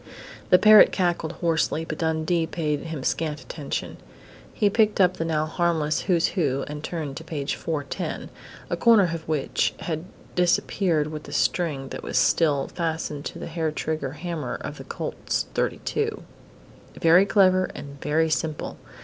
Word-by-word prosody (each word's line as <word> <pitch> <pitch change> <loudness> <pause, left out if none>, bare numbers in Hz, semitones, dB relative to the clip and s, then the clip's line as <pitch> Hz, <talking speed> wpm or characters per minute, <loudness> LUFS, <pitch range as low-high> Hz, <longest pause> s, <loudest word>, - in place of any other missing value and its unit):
The 180 - +8
parrot 215 +2 +8
cackled 175 -3 0
hoarsely, 160 -1 0
but 155 -2 -6
Dundee 160 +1 0
paid 150 -3 -1
him 160 -5 -6
scant 150 +1 -1
attention. 145 -3 -5 0.5
He 210 - +1
picked 215 +1 +2
up 185 -1 +4
the 165 - -2
now 155 -1 0
harmless 160 -2 0
"Who's 170 -2 +3
Who" 145 -7 0
and 150 0 -6
turned 155 -6 -4
to 160 - -7
page 155 -4 -3
410, 150 -4 -4 0.4
a - - 0
corner 230 -4 +6
of 165 -1 -6
which 155 -3 0
had 160 0 -3 0.3
disappeared 175 -2 +2
with 155 -1 -7
the - - -10
string 145 -7 0
that - - -6
was - - -2
still 145 -5 +3
fastened 160 -3 -3
to - - -5
the - - -6
hair 165 -1 -2
trigger 155 -3 -3
hammer 160 -4 -4
of - - -6
the - - -7
Colt's - - -3
.32. - - -1 0.8
Very 175 +4 +6
clever 185 -2 +4
and 140 -1 -9
very 160 +2 +1
simple! 155 -1 -2
160 Hz, 160 wpm, -25 LUFS, 150-175 Hz, 0.8 s, The